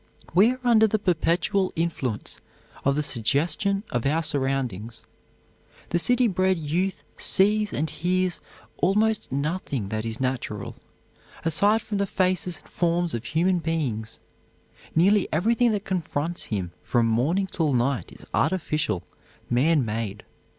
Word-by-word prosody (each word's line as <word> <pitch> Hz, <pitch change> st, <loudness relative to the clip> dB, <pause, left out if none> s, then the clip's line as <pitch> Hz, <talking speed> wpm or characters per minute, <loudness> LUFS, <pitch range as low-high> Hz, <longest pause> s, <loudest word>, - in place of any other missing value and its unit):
We 205 Hz, +8 st, +5 dB
are 255 Hz, -, -10 dB
under 225 Hz, -3 st, +5 dB
the 215 Hz, -, +1 dB
perpetual 185 Hz, +1 st, +1 dB
influence 150 Hz, -9 st, -2 dB, 0.4 s
of 140 Hz, 0 st, +2 dB
the 150 Hz, -, 0 dB
suggestion 160 Hz, -, +1 dB
of 120 Hz, +2 st, 0 dB
our 160 Hz, +4 st, +1 dB
surroundings. 130 Hz, -, -2 dB, 0.8 s
The 175 Hz, -, +1 dB
city 245 Hz, +6 st, +3 dB
bred 185 Hz, -2 st, +2 dB
youth 170 Hz, +5 st, -2 dB
sees 210 Hz, +2 st, +3 dB
and 155 Hz, -, -1 dB
hears 180 Hz, +3 st, -1 dB, 0.4 s
almost 210 Hz, +2 st, +1 dB
nothing 140 Hz, -, -2 dB
that 110 Hz, +1 st, -2 dB
is 115 Hz, 0 st, -4 dB
natural, 125 Hz, -6 st, -3 dB, 0.7 s
aside 205 Hz, +7 st, +3 dB
from 205 Hz, -2 st, -3 dB
the 200 Hz, -, +1 dB
faces 185 Hz, -2 st, 0 dB
and -, -, -20 dB
forms 175 Hz, 0 st, 0 dB
of 115 Hz, 0 st, -4 dB
human 175 Hz, +3 st, +1 dB
beings. 130 Hz, -10 st, -2 dB, 0.8 s
Nearly 195 Hz, +4 st, +4 dB
everything 230 Hz, +8 st, +3 dB
that 205 Hz, 0 st, -2 dB
confronts 170 Hz, -2 st, -2 dB
him 95 Hz, -5 st, -3 dB
from 120 Hz, -2 st, +1 dB
morning 135 Hz, -, +1 dB
till 165 Hz, -5 st, -1 dB
night 125 Hz, 0 st, 0 dB
is -, -, -13 dB
artificial, 155 Hz, -, 0 dB, 0.5 s
man 140 Hz, +3 st, +3 dB
made. 105 Hz, -2 st, -4 dB
165 Hz, 135 wpm, -25 LUFS, 130-190 Hz, 0.8 s, We